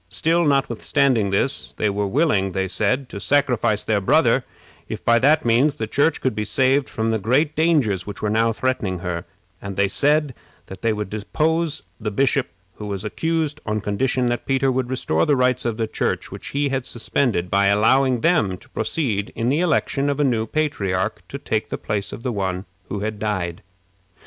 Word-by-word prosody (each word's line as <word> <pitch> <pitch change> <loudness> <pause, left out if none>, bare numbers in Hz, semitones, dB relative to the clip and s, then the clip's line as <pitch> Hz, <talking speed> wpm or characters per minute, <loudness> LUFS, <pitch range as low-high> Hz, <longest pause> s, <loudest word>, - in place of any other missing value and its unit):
Still, 165 +9 +1
notwithstanding 135 -3 +1
this, 100 +7 -1
they 105 - 0
were 100 0 -1
willing, 100 - +1
they 95 +1 -1
said, 105 +8 0
to - - -7
sacrifice 120 -5 +1
their 105 -2 +1
brother 95 - +3 0.5
if - - -6
by 115 0 +5
that 145 +4 +3
means 125 +6 +3
the 110 - -3
Church 145 +8 +1
could 130 - 0
be 105 0 -2
saved 135 +4 +1
from 115 -1 -1
the 110 - 0
great 140 +9 +1
dangers 140 - +2
which 105 0 -6
were 110 - -1
now 115 +1 +2
threatening 110 -6 -1
her; 85 -1 -3 0.4
and 100 -1 -6
they 100 +1 +2
said 145 +5 +2 0.3
that 95 -1 -10
they 115 - +2
would 105 -2 -4
depose 155 +9 -1 0.2
the 105 -2 -2
bishop 135 +4 +1 0.3
who 105 - -6
was 100 0 -4
accused 160 +4 -1
on 105 -1 -1
condition 125 +5 0
that 120 0 -2
Peter 135 0 +2
would 130 -1 -1
restore 85 -11 0
the 145 - +4
rights 125 0 +1
of 115 -2 -1
the 115 - 0
Church 110 - -2
which - - -8
he 140 0 0
had 135 -2 -2
suspended, 115 -6 -1
by 100 0 +3
allowing 120 +5 +3
them 135 - +2
to - - -19
proceed 115 -7 -2
to 115 - -2
the 145 +4 +2
election 150 -4 +1
of 140 0 -1
a - - +3
new 115 -5 +1
patriarch, 105 -10 -1
to 140 - -6
take 110 -5 -2
the - - -3
place 105 -2 -3
of 115 - -8
the 125 - -1
one 95 -2 -2 0.2
who 100 - -3
had 105 0 -3
died. 95 -6 -2
115 Hz, 195 wpm, -22 LUFS, 100-140 Hz, 0.5 s, by